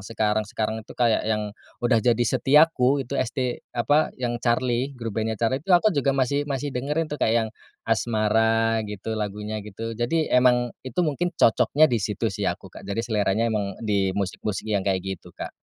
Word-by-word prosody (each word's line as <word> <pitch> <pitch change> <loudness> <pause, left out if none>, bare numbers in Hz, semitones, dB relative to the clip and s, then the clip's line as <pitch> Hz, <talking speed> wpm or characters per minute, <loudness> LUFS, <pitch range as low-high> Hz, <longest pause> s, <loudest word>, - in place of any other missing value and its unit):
sekarang-sekarang 110 +1 -1
tuh - - -11
kayak 115 -3 +3
yang, 105 -1 -1 0.3
udah 120 -2 +4
jadi 120 +1 +2
Setiaku 140 0 +3
itu 140 +3 -2
ST 130 0 -2 0.2
apa 145 +7 +3
yang 120 -2 -3
Charly 125 +2 0
grup 115 -3 -5
bandnya 110 0 -2
Charly 125 +5 0
tuh 180 +2 +4
aku 210 +3 +2
juga 140 -2 +1
masih 140 +3 0
masih 140 +1 -3
dengerin 145 +6 -1
tuh 150 -3 -7
kayak 110 - +2
yang, 110 - -5 0.4
Asmara 115 0 +2
gitu 105 +2 -5
lagunya 105 0 -4
gitu 110 +3 -6
jadi 125 +8 -1
emang 125 -1 +4
itu 130 +8 -1
mungkin 170 +4 -1
cocoknya 145 +6 +4
di 120 - +2
situ 105 0 -1
sih - - -3
aku - - -6
Kak - - -11
jadi 100 +3 -1
seleranya 110 +1 +1
emang 100 -3 -2
dimusik-musik 100 0 -1
yang 100 - +2
kayak 95 -1 -1
gitu, 95 0 -7
Kak. - - -6
115 Hz, 175 wpm, -24 LUFS, 105-130 Hz, 0.4 s, udah